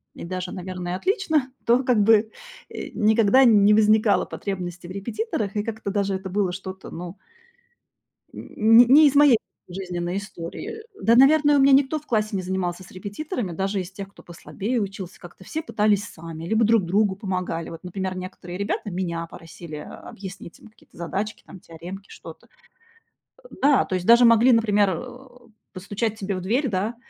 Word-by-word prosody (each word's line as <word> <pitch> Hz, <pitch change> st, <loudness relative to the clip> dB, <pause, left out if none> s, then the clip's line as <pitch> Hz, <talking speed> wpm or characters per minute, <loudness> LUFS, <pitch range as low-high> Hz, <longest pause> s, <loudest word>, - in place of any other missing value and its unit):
и -, -, -9 dB
даже, 185 Hz, +1 st, -5 dB
наверное, 180 Hz, -1 st, -5 dB
отлично, 315 Hz, -, 0 dB
то 245 Hz, +3 st, +3 dB
как 250 Hz, -4 st, +2 dB
бы, 220 Hz, 0 st, +4 dB, 0.4 s
э, -, -, -7 dB
никогда 220 Hz, +4 st, +4 dB
не 210 Hz, -2 st, +5 dB
возникало 215 Hz, 0 st, +3 dB
потребности 180 Hz, -3 st, -6 dB
в -, -, -9 dB
репетиторах, 230 Hz, -, -4 dB
и 210 Hz, -, 0 dB
как-то 220 Hz, -3 st, -5 dB
даже 200 Hz, -1 st, -1 dB
это 190 Hz, 0 st, -6 dB
было 190 Hz, -1 st, 0 dB
что-то, 190 Hz, +1 st, -8 dB
ну 175 Hz, +2 st, -8 dB, 1.2 s
Н 225 Hz, +1 st, +2 dB
не 245 Hz, -, +9 dB
не 290 Hz, +5 st, +7 dB
из 280 Hz, -, 0 dB
моей 285 Hz, -5 st, +6 dB, 0.3 s
жизненной 180 Hz, -1 st, -4 dB
истории. 200 Hz, -, -7 dB, 0.2 s
Да, 230 Hz, +1 st, +3 dB
наверное, 290 Hz, +2 st, +5 dB
у 275 Hz, -, +4 dB
меня 275 Hz, 0 st, +5 dB
никто 280 Hz, +3 st, +3 dB
в 300 Hz, -, -24 dB
классе 215 Hz, -2 st, 0 dB
не 190 Hz, -, -1 dB
занимался 185 Hz, -1 st, -3 dB
с -, -, -15 dB
репетиторами, 205 Hz, -, -5 dB
даже 195 Hz, +3 st, -2 dB
из 180 Hz, -, -9 dB
тех, 195 Hz, 0 st, -8 dB
кто -, -, -18 dB
послабее 210 Hz, +7 st, -4 dB
учился, 195 Hz, -2 st, -7 dB
как-то 175 Hz, +1 st, -14 dB
все 315 Hz, +11 st, -4 dB
пытались 210 Hz, -8 st, +1 dB
сами 165 Hz, 0 st, -9 dB
либо 220 Hz, +4 st, +2 dB
друг 225 Hz, -3 st, +3 dB
другу 195 Hz, +2 st, +1 dB
помогали. 185 Hz, -4 st, -4 dB
Вот, 165 Hz, +2 st, -10 dB
например, 185 Hz, +1 st, -4 dB
некоторые 180 Hz, -1 st, -8 dB
ребята 200 Hz, +1 st, -3 dB
меня 170 Hz, -2 st, -3 dB
просили, 165 Hz, -1 st, -11 dB
а, 150 Hz, -, -10 dB
объяснить 190 Hz, -3 st, -10 dB
им -, -, -16 dB
какие-то 215 Hz, -, -24 dB
задачки, 195 Hz, +5 st, -4 dB
там, 190 Hz, -, -12 dB
теоремки, 175 Hz, +5 st, -10 dB
что-то. -, -, -12 dB, 1.0 s
Э, -, -, -14 dB
да, 285 Hz, -1 st, +4 dB
то 185 Hz, -, -3 dB
есть 180 Hz, 0 st, -4 dB
даже 235 Hz, +1 st, +7 dB
могли, 230 Hz, +2 st, +6 dB
например, 210 Hz, -3 st, +3 dB
э, 245 Hz, -, -8 dB, 0.6 s
постучать 205 Hz, +4 st, -3 dB
тебе 200 Hz, -1 st, -3 dB
в 185 Hz, -, -4 dB
дверь, 245 Hz, +9 st, 0 dB
да 210 Hz, +4 st, -2 dB
200 Hz, 175 wpm, -23 LUFS, 185-230 Hz, 1.2 s, не